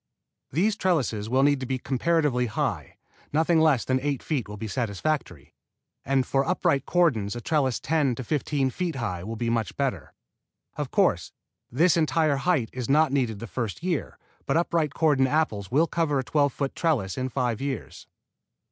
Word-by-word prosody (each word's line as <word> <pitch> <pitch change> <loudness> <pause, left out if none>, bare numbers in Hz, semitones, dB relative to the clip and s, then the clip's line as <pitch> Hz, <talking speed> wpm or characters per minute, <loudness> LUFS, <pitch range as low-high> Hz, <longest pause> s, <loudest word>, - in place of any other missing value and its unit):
These 200 - +1
trellises 130 - 0
will 130 +2 +3
need 145 -1 +3
to 130 - -5
be 130 0 -1
comparatively 135 -1 +1
high. 105 - -3 0.3
Nothing 160 +2 +3
less 150 -7 +3
than 130 0 +1
eight 140 -2 -2
feet 135 -9 -2
will 105 - -7
be 110 - -5
satisfactory, 105 - -3 0.5
and 135 0 +1
for 135 +1 +1
upright 165 -4 0
cordons 120 - +2
a - - -4
trellis 135 -1 0
ten 150 -6 +1
to 130 - -5
fifteen 140 -1 0
feet 175 +2 -3
high 90 -9 -3
will 110 +4 -5
be 115 +1 -1
much 115 -4 -2
better. - - -2 0.6
Of - - -3
course, - - +1 0.4
this 165 +7 +3
entire 155 -2 +2
height 135 -6 0
is 125 -2 -4
not 155 +1 +4
needed 125 -6 0
the 115 - -7
first 115 - -4
year, 175 -5 -2 0.3
but - - +2
upright 165 -3 0
cordon 145 -5 +3
apples 130 - 0
will 150 +8 +3
cover 165 -4 0
a 135 - 0
twelve 145 +1 +1
foot 135 +1 -3
trellis 135 - 0
in 130 0 -2
five 125 -3 -1
years. 135 -4 -5
135 Hz, 175 wpm, -26 LUFS, 120-155 Hz, 0.6 s, not